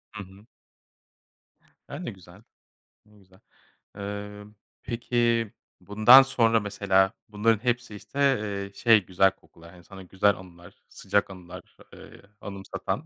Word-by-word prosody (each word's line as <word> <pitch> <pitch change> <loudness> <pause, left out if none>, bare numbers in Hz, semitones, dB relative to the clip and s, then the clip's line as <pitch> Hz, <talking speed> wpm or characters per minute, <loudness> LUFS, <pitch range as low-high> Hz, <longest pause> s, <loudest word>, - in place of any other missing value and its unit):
Hı 105 - -6
hı. 95 +2 -17 1.4
A, 145 - -8
ne 175 - -6
güzel. 95 -1 -17 0.7
Ne 105 0 -23
güzel. 95 -1 -24 0.6
Eee, 105 0 -7 0.4
peki, 120 -1 -1 0.3
bundan 110 +6 +7
sonra 115 -4 +2
mesela 100 -2 +1 0.2
bunların 110 +1 0
hepsi, 120 -2 -2
işte, 135 - -11 0.2
eee, 100 -1 -5
şey 110 -2 +3
güzel 95 +1 +3
kokular, 85 -3 -19
hani 90 -2 -17
sana 95 +1 -12
güzel 95 +3 +1
anılar, 85 -2 -16
sıcak 100 -1 -1
anılar, 90 -2 -12 0.2
eee, - - -15 0.2
anımsatan, 100 -1 -6
100 Hz, 125 wpm, -26 LUFS, 95-115 Hz, 1.4 s, bundan